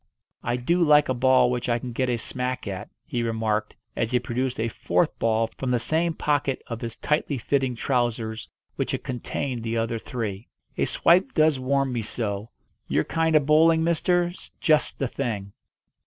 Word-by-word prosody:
"I 120 - -1
do 170 +9 +1
like 150 -3 +5
a - - +3
ball 125 0 +4
which 125 0 -2
I 120 - +2
can 125 +1 -6
get 130 +2 -1
a 120 - +1
smack 125 +1 -3
at," 95 -2 -5 0.2
he 125 -7 -2
remarked 110 -2 -1 0.2
as 115 - 0
he 125 - +2
produced 125 +1 -2
a 115 - +1
fourth 115 - 0
ball 115 0 +2
from 130 - -2
the 125 - +3
same 160 +7 0
pocket 145 -2 0
of 115 -1 -6
his 115 -2 -5
tightly 150 -2 0
fitting 130 +1 0
trousers 115 -3 -1 0.3
which - - -1
had - - -3
contained 125 0 -3
the 115 0 -2
other 115 0 -1
three. 110 -3 -5 0.3
"A - - +1
swipe 185 +10 +3
does 155 -3 +4
warm 135 0 +1
me 120 - -1
so. 105 -1 -3 0.4
Your - - +1
kind 160 -1 +1
of 150 -2 +4
bowling, 160 +2 +5
mister, 175 +1 +2
's 175 - -13
just 155 -1 +2
the 135 - -1
thing." 105 -7 -4
125 Hz, 185 wpm, -25 LUFS, 115-150 Hz, 0.4 s, like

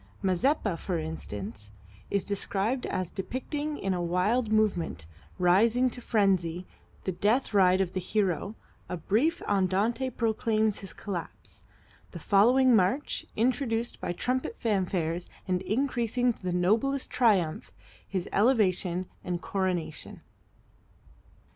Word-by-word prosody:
"Mazeppa," 195 - +1
for 180 -3 -2
instance, 105 -10 -6 0.4
is 200 -2 0
described 205 +4 -1
as 185 -2 -2
depicting 290 +8 -4
in 195 -1 -1
a 180 - -1
wild 205 +7 +1
movement, 195 - +1 0.3
rising 225 +8 +4
to 245 - -6
frenzy, 185 -6 +1 0.4
the 190 - -1
death 215 +8 +1
ride 190 -1 +5
of 185 -1 -1
the 185 - -1
hero, 195 +1 -1 0.3
a 180 - -3
brief 240 - +1
andante 205 +6 +1
proclaims 220 -2 0
his 195 - -8
collapse, 180 -6 -7 0.5
the 170 - -6
following 245 +8 +5
march, 215 +9 +1
introduced 235 0 0
by - - -2
trumpet 250 +8 -2
fanfares 180 -5 -1 0.2
and 180 -1 0
increasing 245 +2 0
to - - -22
the 185 -1 -2
noblest 220 +10 +1
triumph, 195 -10 +2 0.4
his 185 -3 -3
elevation 190 -6 +2 0.2
and 175 -1 -3
coronation. 180 -6 -3
200 Hz, 120 wpm, -28 LUFS, 180-235 Hz, 0.5 s, ride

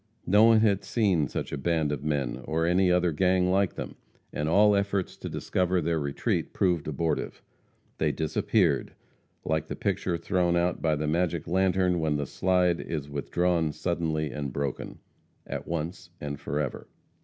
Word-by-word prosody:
No 105 +4 +6
one 115 -1 +6
had 100 -3 +2
seen 100 - +1
such - - -4
a 70 - -3
band 80 -1 0
of 75 -1 -3
men 70 -5 -1
or 80 +1 0
any 90 +2 +3
other 90 -1 +3
gang 90 +2 +2
like 95 0 +1
them, - - -6 0.4
and 75 +1 -1
all 105 +4 +5
efforts 100 -1 -1
to - - -6
discover 90 0 0
their 85 0 0
retreat 70 -1 -2
proved 90 -6 +1
abortive. 80 +2 -2 0.6
They 75 -1 +2
disappeared 80 +1 0 0.5
like 80 0 -1
the - - -4
picture 85 -2 -1
thrown 85 +1 +1
out 85 0 0
by 80 -2 +2
the 75 +1 -2
magic 85 +1 0
lantern 95 -1 +2
when 80 -2 0
the 70 - -2
slide 90 +2 +1
is 75 -3 -5
withdrawn 80 +2 0
suddenly 80 -1 -1
and 70 -3 -4
broken 70 0 -4 0.5
at - - -6
once 85 +1 -4
and 70 -1 -5
forever. 70 -1 -3
85 Hz, 165 wpm, -27 LUFS, 75-90 Hz, 0.6 s, No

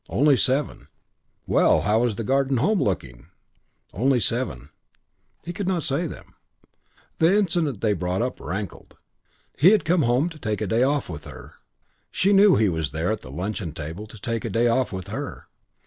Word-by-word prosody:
Only 145 +2 +4
seven: 135 +3 -1 0.6
"Well, - - +3
how 105 +2 +2
was 120 -3 0
the 115 - -4
Garden 135 +2 +1
Home 200 - +2
looking?" 70 - -3 0.7
Only 130 +5 +2
seven. 90 - -2 0.7
He 175 - -5
could 190 +1 -4
not 180 -4 0
say 155 +5 0
them. - - -11 0.9
The 170 +5 +4
incident 165 - 0
they 110 -2 +2
brought 90 +3 -1
up 125 - -4
rankled. 95 +1 -6 0.6
He 165 - +7
had 205 -6 +3
come 170 +1 +3
home 125 +4 +2
to 160 -2 -13
take 110 -5 -2
a 105 - -2
day 110 +4 +1
off 140 +2 +1
with 80 -3 -8
her. 75 - -11 0.6
She 195 +2 +2
knew 200 0 +6
he 110 - +3
was 80 -4 -1
there 80 +6 -2
at 110 - -3
the - - -11
luncheon 90 +3 -4
table 80 +8 -7
to 110 - -13
take 115 +2 -3
a 115 - -3
day 115 +4 +2
off 125 +2 +1
with 95 -2 -6
her. - - -6
115 Hz, 185 wpm, -24 LUFS, 95-150 Hz, 0.9 s, He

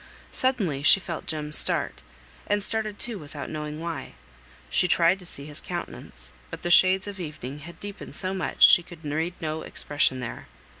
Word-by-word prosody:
Suddenly 205 - +1
she 150 - +6
felt 170 -3 -6
Jem 150 -1 -3
start, - - 0 0.5
and 205 0 +1
started 215 0 -2
too 235 -4 -1
without 145 -1 -7
knowing 150 0 -4
why; 165 -4 -5 0.5
she 180 - +2
tried 175 +2 +4
to 180 - -12
see 140 - -8
his 150 -1 -3
countenance, 65 +2 -6 0.2
but - - -8
the 175 - 0
shades 185 +2 +6
of 205 -1 -7
evening 150 -4 -6
had 170 +4 -11
deepened 205 0 -7
so 185 0 0
much 190 -3 +6
she - - +9
could 170 -2 -13
read 160 +4 -1
no 155 -1 -3
expression 145 -3 0
there. 115 -2 -6
165 Hz, 180 wpm, -26 LUFS, 150-190 Hz, 0.5 s, she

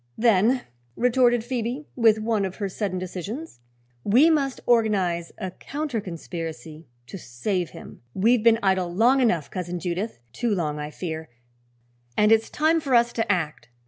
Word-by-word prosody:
"Then," 230 +2 +3 0.3
retorted 245 -1 +3
Phoebe, 245 +3 -3
with 225 -3 +4
one 215 -1 0
of 190 -1 -3
her 205 - -3
sudden 190 -1 -3
decisions, 185 - -6 0.4
"we 265 +11 +5
must 275 -4 0
organize 195 -8 +1
a 185 - -4
counter 285 0 -4
conspiracy 165 -3 -7 0.2
to 195 - -9
save 175 - -3
him. - - -12
We've 230 +4 +3
been 230 0 +5
idle 190 -2 +1
long 240 +9 +4
enough, 175 - +1
Cousin 180 -1 -4
Judith 180 - -3 0.2
too 235 -4 0
long, 150 -4 -2
I 150 0 -4
fear 160 -1 -6 0.9
and 210 +1 +4
it's 225 0 +4
time 315 +2 +2
for 275 -5 0
us 235 0 +4
to 225 -3 0
act." 155 -9 -2
210 Hz, 155 wpm, -24 LUFS, 175-240 Hz, 0.9 s, we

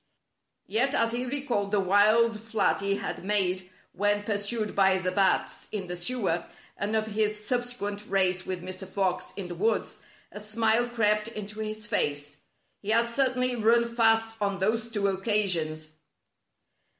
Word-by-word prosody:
Yet, 265 +5 +1
as 230 0 +2
he 250 +1 -2
recalled 250 -7 -1
the 205 - +3
wild 215 +4 +4
flight 215 -3 0
he 200 0 +1
had 200 -2 -5
made 190 -2 0 0.2
when 205 +1 +1
pursued 210 +1 -1
by 190 -1 +4
the 185 -1 -1
bats 190 0 +1
in 205 -3 -3
the 180 0 -5
sewer, 175 -3 -1 0.3
and 205 +2 -2
of 215 0 +1
his 210 0 -1
subsequent 225 -4 -2
race 185 -2 +1
with 185 -2 -5
Mr. 185 +1 -7
Fox 190 -1 -1
in 195 -3 -5
the 175 - -6
woods, 215 +6 -1 0.3
a - - -8
smile 225 +3 +1
crept 210 -2 +1
into 210 -1 -7
his 215 0 -5
face. 145 -8 -1 0.4
He 205 - -8
had 230 +2 +3
certainly 255 0 +1
run 235 +1 +3
fast 225 -1 +2
on 200 -1 0
those 220 +4 0
two 205 -3 -1
occasions. 185 -6 -1
210 Hz, 155 wpm, -28 LUFS, 190-225 Hz, 0.4 s, wild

